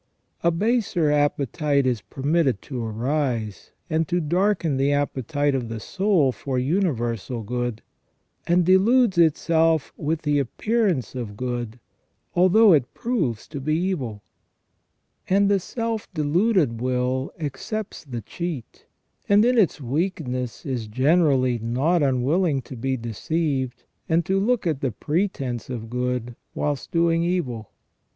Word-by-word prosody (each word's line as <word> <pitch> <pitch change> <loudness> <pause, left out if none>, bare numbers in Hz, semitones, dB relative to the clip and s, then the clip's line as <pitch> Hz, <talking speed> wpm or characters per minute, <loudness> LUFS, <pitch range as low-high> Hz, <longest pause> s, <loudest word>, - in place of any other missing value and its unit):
A 170 - +5
baser 180 -4 +1
appetite 145 0 +1
is 125 -4 0
permitted 140 - 0
to 125 -4 -5
arise 115 - -2 0.2
and 160 0 0
to 175 - +1
darken 175 -2 +1
the 135 +1 +2
appetite 145 0 0
of 125 -4 -2
the 115 -1 -4
soul 185 - +2
for 130 +1 -4
universal 125 - -1
good, 120 0 -3 0.6
and 175 0 +3
deludes 195 +2 +4
itself 160 -1 +3
with 155 +1 -2
the 145 -1 +2
appearance 190 - 0
of 115 -5 -6
good, 120 -1 -4 0.5
although 185 +3 +6
it 140 -5 +2
proves 165 - -1
to 140 - -6
be 155 +3 0
evil; 145 - -2 1.1
and 200 +1 +4
the 200 - +3
self 230 +2 -4
deluded 155 - +2
will 130 +1 -1
accepts 165 - -5
the 125 -6 -6
cheat, 160 - -6 0.4
and 205 +2 +6
in 250 +1 +3
its 205 -9 +3
weakness 130 - -3
is 125 -6 -3
generally 130 0 +2
not 130 +10 +1
unwilling 140 +3 +1
to 130 - -9
be 130 +3 -1
deceived, 130 +2 -2 0.3
and 165 0 +2
to 190 +1 +1
look 230 +1 +1
at 155 -5 -1
the 135 - 0
pretence 135 - -2
of 115 -3 -6
good 125 -1 -2 0.2
whilst 145 -3 -2
doing 165 0 +2
evil. 140 - -2
145 Hz, 130 wpm, -24 LUFS, 125-175 Hz, 1.1 s, although